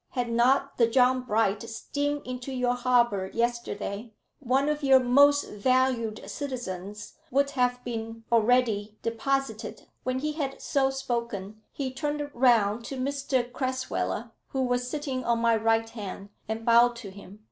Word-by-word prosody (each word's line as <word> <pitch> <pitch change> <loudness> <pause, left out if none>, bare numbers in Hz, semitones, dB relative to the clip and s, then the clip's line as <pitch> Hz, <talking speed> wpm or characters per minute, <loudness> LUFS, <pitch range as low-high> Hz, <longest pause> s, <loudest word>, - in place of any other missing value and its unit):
Had 245 -2 -1
not 260 +4 +2
the 230 - +6
John 255 +2 +3
Bright 220 -4 +1
steamed 290 +5 -3
into 255 +1 -5
your 250 -1 +1
harbour 240 -6 +2
yesterday, 230 -2 -2 0.3
one 270 +1 +1
of 300 0 0
your 270 -2 +6
most 285 +3 +5
valued 240 0 0
citizens 210 -8 -6
would 280 +1 +2
have 250 -2 0
been 225 -1 -5
already 225 -2 +2
deposited." 230 -1 -2 0.2
When 255 0 -1
he 305 +3 -1
had 285 -3 -4
so 270 -1 +1
spoken, 235 -6 -4
he 265 -2 -4
turned 290 +1 -3
round 235 -3 +3
to 270 - -5
Mr 265 -2 -1
Crasweller, 260 0 -2 0.2
who 265 -1 -1
was 245 0 0
sitting 275 -3 -3
on 235 -1 +1
my 230 0 +3
right 225 +1 +2
hand, 200 -2 -7 0.2
and 220 +1 -4
bowed 235 +1 +5
to 225 -5 -8
him. 200 +1 -13
245 Hz, 145 wpm, -27 LUFS, 225-265 Hz, 0.3 s, the